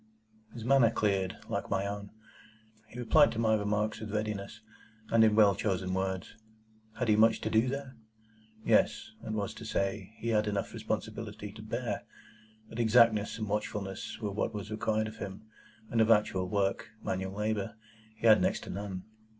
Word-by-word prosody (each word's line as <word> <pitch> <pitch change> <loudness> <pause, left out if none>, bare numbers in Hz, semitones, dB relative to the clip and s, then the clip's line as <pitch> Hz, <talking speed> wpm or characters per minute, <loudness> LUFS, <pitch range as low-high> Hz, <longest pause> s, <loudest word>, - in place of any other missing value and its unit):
His 115 -2 -8
manner 135 -3 +5
cleared, 100 -4 0
like - - -3
my 95 - 0
own. 100 0 -5 0.8
He 115 - -12
replied 145 +5 +5
to - - -6
my 110 -1 +3
remarks 105 0 0
with 110 -2 -6
readiness, 105 0 -3 0.5
and 115 -1 +6
in 110 -1 +5
well 105 -2 +6
chosen 95 -1 -1
words. 95 0 -2 0.6
Had 125 - -1
he 105 - +5
much 110 +1 +5
to - - -2
do 110 +3 +4
there? 135 0 -4 0.7
Yes; - - +2
that - - -6
was 105 -2 -2
to - - -10
say, 105 -1 -2
he 115 - -3
had 105 -1 +2
enough 100 -1 -2
responsibility 105 -1 -4
to 110 +1 -11
bear; 115 +3 -3 0.7
but 110 +1 -8
exactness 110 -2 +4
and 110 -2 -3
watchfulness 100 -2 -3
were 105 -2 -3
what 105 +2 -2
was 105 +1 -6
required 110 0 0
of 110 - -9
him, 95 +2 -7 0.5
and 115 - +3
of 110 - +3
actual 95 -4 +3
work—manual 100 -1 -2
labour—he 110 +1 -5
had 110 -1 +7
next - - +1
to - - -7
none. 95 -1 -5
110 Hz, 165 wpm, -31 LUFS, 100-110 Hz, 0.8 s, had